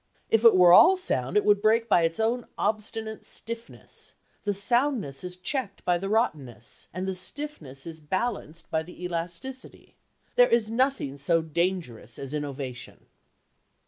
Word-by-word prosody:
If 225 Hz, 0 st, +3 dB
it 230 Hz, -3 st, +8 dB
were 180 Hz, -1 st, +7 dB
all 370 Hz, -, +8 dB
sound, 130 Hz, -, 0 dB
it 210 Hz, -, +2 dB
would 205 Hz, -1 st, +4 dB
break 225 Hz, +2 st, +3 dB
by 175 Hz, -, +4 dB
its 165 Hz, +2 st, 0 dB
own 235 Hz, +2 st, 0 dB
obstinate 220 Hz, +1 st, -2 dB
stiffness: 230 Hz, 0 st, -8 dB, 0.3 s
the 205 Hz, -, +1 dB
soundness 215 Hz, -, +1 dB
is 180 Hz, 0 st, -5 dB
checked 200 Hz, +2 st, -4 dB
by 175 Hz, -1 st, +2 dB
the 195 Hz, +2 st, -4 dB
rottenness, 145 Hz, -, -2 dB
and 185 Hz, +2 st, -4 dB
the 190 Hz, -, -1 dB
stiffness 185 Hz, -, -5 dB
is 160 Hz, -1 st, -9 dB
balanced 185 Hz, -1 st, -3 dB
by 160 Hz, -, +1 dB
the 180 Hz, +2 st, -11 dB
elasticity. 180 Hz, +9 st, -6 dB, 0.4 s
There -, -, +6 dB
is 225 Hz, -2 st, +2 dB
nothing 250 Hz, -, 0 dB
so 165 Hz, +4 st, +1 dB
dangerous 160 Hz, -, -2 dB
as 135 Hz, +1 st, -7 dB
innovation." 140 Hz, -4 st, -6 dB
185 Hz, 150 wpm, -26 LUFS, 160-230 Hz, 0.4 s, it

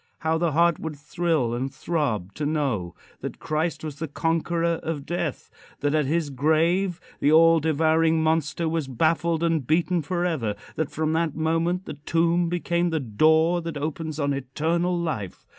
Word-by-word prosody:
How 160 Hz, 0 st, +1 dB
the 170 Hz, -3 st, +1 dB
heart 170 Hz, +1 st, +3 dB
would 160 Hz, -2 st, -5 dB
thrill 155 Hz, -4 st, -1 dB
and 130 Hz, +3 st, -2 dB
throb 120 Hz, -, -2 dB
to 150 Hz, -, -5 dB
know 135 Hz, -, -1 dB, 0.2 s
that -, -, -6 dB
Christ 155 Hz, +2 st, -2 dB
was 150 Hz, -3 st, -5 dB
the 160 Hz, +1 st, -4 dB
conqueror 165 Hz, +2 st, 0 dB
of 155 Hz, -3 st, -4 dB
Death; 170 Hz, -4 st, -3 dB, 0.3 s
that 145 Hz, 0 st, +1 dB
at 150 Hz, -3 st, +2 dB
his 155 Hz, -1 st, 0 dB
grave 165 Hz, +6 st, +1 dB, 0.2 s
the 145 Hz, -, +3 dB
all 165 Hz, +1 st, +6 dB
devouring 160 Hz, +1 st, +2 dB
monster 160 Hz, +1 st, 0 dB
was 160 Hz, -3 st, -1 dB
baffled 160 Hz, +5 st, +1 dB
and 165 Hz, -6 st, +1 dB
beaten 170 Hz, +2 st, +2 dB
forever; 160 Hz, -, -1 dB, 0.2 s
that 160 Hz, -2 st, -1 dB
from 155 Hz, 0 st, -1 dB
that 160 Hz, -2 st, 0 dB
moment 165 Hz, +3 st, 0 dB
the -, -, -6 dB
tomb 165 Hz, +3 st, +1 dB
became 175 Hz, 0 st, 0 dB
the 160 Hz, -1 st, 0 dB
door 160 Hz, +8 st, +3 dB
that 165 Hz, -2 st, -5 dB
opens 155 Hz, +1 st, -4 dB
on 140 Hz, -1 st, +1 dB
eternal 160 Hz, +7 st, -1 dB
life! 130 Hz, -, -4 dB
160 Hz, 165 wpm, -25 LUFS, 145-170 Hz, 0.3 s, all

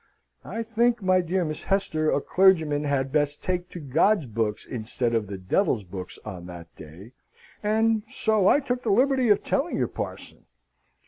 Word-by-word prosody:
"I 230 Hz, -, -4 dB
think, 235 Hz, 0 st, +1 dB
my 185 Hz, 0 st, +3 dB
dear 180 Hz, +1 st, -1 dB
Miss 155 Hz, -1 st, -4 dB
Hester, 160 Hz, -6 st, 0 dB
a -, -, +2 dB
clergyman 160 Hz, -6 st, +3 dB
had 135 Hz, -2 st, 0 dB
best 145 Hz, 0 st, 0 dB
take 180 Hz, 0 st, -2 dB
to 175 Hz, -, -8 dB
God's 160 Hz, +5 st, +2 dB
books 110 Hz, -2 st, -2 dB
instead 120 Hz, +1 st, -3 dB
of 110 Hz, -3 st, 0 dB
the 100 Hz, 0 st, -6 dB
Devil's 105 Hz, -, 0 dB
books 90 Hz, 0 st, -8 dB
on 90 Hz, -5 st, -7 dB
that 85 Hz, -2 st, -11 dB
day 85 Hz, +9 st, -12 dB, 0.5 s
and 220 Hz, +1 st, +2 dB
so 220 Hz, -5 st, +1 dB
I 290 Hz, -, +5 dB
took 250 Hz, -2 st, -2 dB
the 230 Hz, -, -2 dB
liberty 255 Hz, +3 st, +3 dB
of 205 Hz, -, +3 dB
telling 285 Hz, +5 st, -1 dB
your -, -, +1 dB
parson." -, -, -7 dB
165 Hz, 175 wpm, -25 LUFS, -, 0.5 s, I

